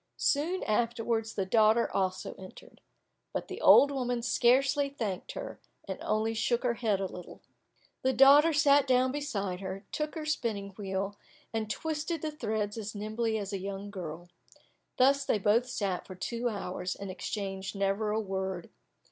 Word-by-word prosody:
Soon 330 +6 +1
afterwards 225 0 0
the 195 - 0
daughter 220 +3 +4
also 190 -1 -1
entered. 190 -1 -13 0.5
But - - -3
the - - -6
old 285 - +8
woman 245 -3 -1
scarcely 270 +4 +3
thanked 215 -9 -4
her, - - -7 0.3
and - - -5
only 220 +1 0
shook 235 +2 0
her 245 -2 +2
head 220 -4 0
a 195 - -1
little. 180 -1 -9 0.6
The 260 - +2
daughter 280 +5 +7
sat 285 -2 +4
down 255 0 +3
beside 205 -11 -3
her, 195 +1 -6
took 300 -1 -3
her 315 -2 -4
spinning 220 -10 -2
wheel, 195 0 -4 0.3
and 220 -1 -2
twisted 315 +4 -3
the 310 - -1
threads 220 -7 -2
as 215 0 -6
nimbly 220 +2 -1
as 200 -1 -4
a 195 - -2
young 200 +1 -5
girl. 175 -3 -7 0.7
Thus 275 +2 +4
they 245 - +1
both 215 +5 +2
sat 195 -6 -2
for 185 - -8
two 235 +6 -2
hours, 185 -3 -4
and 200 -1 -6
exchanged 195 0 -4
never 200 +2 0
a 215 +1 +1
word. 190 -3 -4
220 Hz, 165 wpm, -30 LUFS, 195-260 Hz, 0.7 s, old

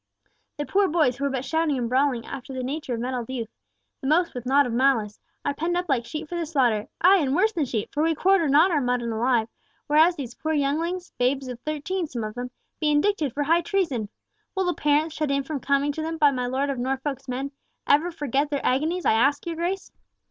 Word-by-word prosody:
The 290 - -2
poor 395 +4 +2
boys, 305 -7 +2
who 280 - -2
were - - +1
but 265 -1 -3
shouting 320 -2 +1
and 240 -2 -1
brawling 255 -1 +1
after 270 0 -7
the 255 - -3
nature 270 -1 -3
of - - -5
mettled 245 -1 -3
youth—the 255 +2 -8
most 335 +4 +2
with 245 -1 -6
nought 280 +2 +4
of 245 - -3
malice—are 245 +1 0
penned 335 +4 -1
up 355 0 -2
like 245 -4 +1
sheep 305 0 -5
for 350 - -6
the 330 - -2
slaughter—ay, 270 - +3
and 275 -1 0
worse 430 +5 +3
than 325 -6 0
sheep, 225 -5 -3
for 295 - 0
we 325 0 +2
quarter 365 -1 +3
not 310 +7 +5
our 300 -4 +2
mutton 245 -2 0
alive, 230 0 +1 0.4
whereas 315 +4 +4
these 255 -6 -6
poor 315 +4 -3
younglings—babes 285 -3 -1
of 250 -2 -6
thirteen, 310 +6 -3
some 240 -6 -5
of 215 0 -4
them—be 250 +5 -5
indicted 300 -1 +2
for 290 +5 -1
high 330 +4 +3
treason! 330 - -1 0.5
Will 380 -1 +1
the 355 - +1
parents, 300 +1 +1
shut 305 -2 -2
in 275 0 +1
from 290 +1 -4
coming 280 +2 +1
to 315 - -5
them 325 +1 -3
by 295 -3 +5
my 250 -2 -2
Lord 270 +3 0
of 265 - -4
Norfolk's 270 +2 -3
men, 265 +2 -3 0.3
ever 300 +5 +3
forget 290 -2 -1
their 285 -2 -2
agonies, 315 +8 0
I - - +4
ask 275 +7 +2
your 335 -1 -3
Grace?" 355 +4 -3
285 Hz, 220 wpm, -25 LUFS, 255-320 Hz, 0.5 s, not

